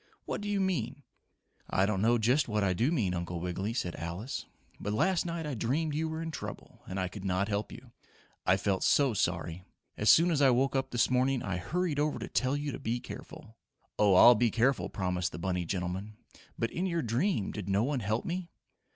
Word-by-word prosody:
"What - - -3
do 205 - -4
you 205 -1 +1
mean?" 145 - -1 0.7
"I 95 - +2
don't 100 -2 0
know 120 +3 +4
just 125 +7 +2
what 105 -2 0
I 95 -2 +2
do 120 - +1
mean, 110 - +1
Uncle 85 0 -3
Wiggily," 90 +4 -3
said 90 -8 -2
Alice. 85 - -5 0.3
"But 105 - -3
last 180 - +1
night 165 -1 -3
I 150 - -3
dreamed 140 +7 -1
you 160 +2 -1
were 160 +1 -4
in 165 - -4
trouble - - -8
and 95 +1 -4
I 95 - 0
could 95 +1 -9
not 95 +2 0
help 105 0 -2
you. 125 0 -12 0.5
I 95 - +4
felt 95 -1 0
so 140 -4 +4
sorry! 85 -2 -1 0.3
As 105 - +2
soon 170 +2 +7
as 150 -3 +1
I 135 - +6
woke 130 +2 +2
up 135 0 0
this 120 0 +1
morning 130 0 +2
I 95 -2 -2
hurried 165 - -1
over 150 0 +1
to - - -5
tell 130 +2 0
you 145 0 -3
to - - -6
be 115 +2 -2
careful." 125 -4 -10 0.4
"Oh, 100 -3 +5
I'll 120 +6 +9
be 120 +1 +2
careful," 120 +5 +1
promised 90 -2 -2
the - - -5
bunny 90 0 -2
gentleman. 95 +4 -4 0.4
"But 115 - -1
in 185 +3 -1
your 170 -3 -1
dream 120 - 0
did 100 -2 -6
no 100 +3 +2
one 140 +1 0
help 110 +1 -1
me?" 175 0 -3
115 Hz, 220 wpm, -30 LUFS, 95-145 Hz, 0.7 s, I'll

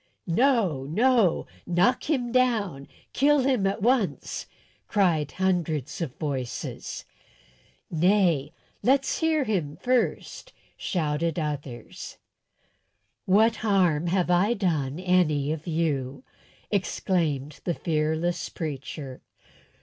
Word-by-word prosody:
"No, 190 - +2
no; 220 - +3 0.2
knock 180 - +2
him 250 -6 0
down! 220 - +1 0.3
Kill 290 +1 +4
him 255 -7 +2
at 195 0 -2
once!" 220 - 0 0.4
cried 165 -8 +1
hundreds 170 -6 -1
of 150 -7 -3
voices. 135 -5 -4 0.9
"Nay, 170 -4 +2 0.3
let's 270 +2 +2
hear 320 -2 +2
him 175 - -2
first," 255 - -1 0.2
shouted 160 -1 -1
others. 145 -6 -5 1.1
"What 220 +4 +4
harm 180 -7 +2
have 180 0 +1
I 195 +7 +3
done 160 - -1
any 170 -6 +2
of 160 +2 -5
you?" 155 - -1 0.5
exclaimed 160 -7 -1
the 175 - -1
fearless 160 +2 -1
preacher. 140 -3 -6
175 Hz, 95 wpm, -26 LUFS, 150-215 Hz, 1.1 s, Kill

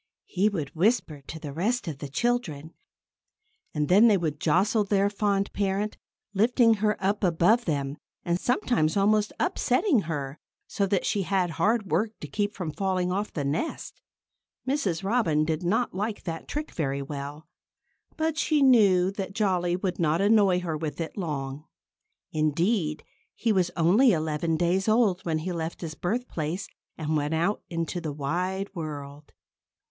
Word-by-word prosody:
He 195 +3 +1
would 155 -8 -4
whisper 175 - +1
to 160 - -6
the 150 -3 -7
rest 215 - -1
of 150 -4 -5
the 145 - -5
children. 160 - -1 1.0
And 150 -1 -1
then 205 +8 +6
they 210 -3 +5
would 155 -4 -2
jostle 195 +8 +2
their 200 0 +1
fond 200 -1 0
parent, 200 +1 -1 0.4
lifting 230 +3 +4
her 210 -1 +2
up 200 +2 0
above 185 +7 +3
them, 140 -3 -2 0.3
and 175 0 0
sometimes 230 -9 +1
almost 210 +1 +3
upsetting 340 - +2
her, 140 -2 -4 0.3
so 200 -2 -1
that 190 -1 0
she 205 - +1
had 185 -1 0
hard 210 +3 0
work 215 +7 0
to - - -5
keep 205 0 -2
from 175 -5 -4
falling 185 +1 -1
off 200 +3 -2
the 145 - -3
nest. 150 - -3 0.7
Mrs. 200 - 0
Robin 190 -8 +2
did 160 +1 -1
not 210 +7 0
like 210 +3 -3
that 165 -2 -5
trick 300 +1 -4
very 140 -3 -2
well. 145 +2 -7 0.7
But 320 0 0
she 300 -3 +2
knew 195 -8 +5
that 195 -1 -5
Jolly 185 -5 +1
would 185 -1 -3
not 160 0 +2
annoy 200 -3 +4
her 165 -3 -3
with 155 0 -4
it 165 - -4
long. 150 -5 -4 0.7
Indeed, 155 +2 0 0.3
he 230 - 0
was 185 -4 +2
only 200 +9 +5
eleven 160 0 0
days 180 +4 +1
old 215 -5 +3
when 160 -2 0
he 170 +4 -3
left 165 -1 -4
his 165 -3 -5
birthplace 180 -4 -3 0.3
and 155 0 -1
went 150 +1 0
out 175 +6 0
into 165 +1 -3
the 155 -3 -3
wide 180 +7 -2
world. 145 -3 -7
180 Hz, 160 wpm, -27 LUFS, 155-210 Hz, 1.0 s, then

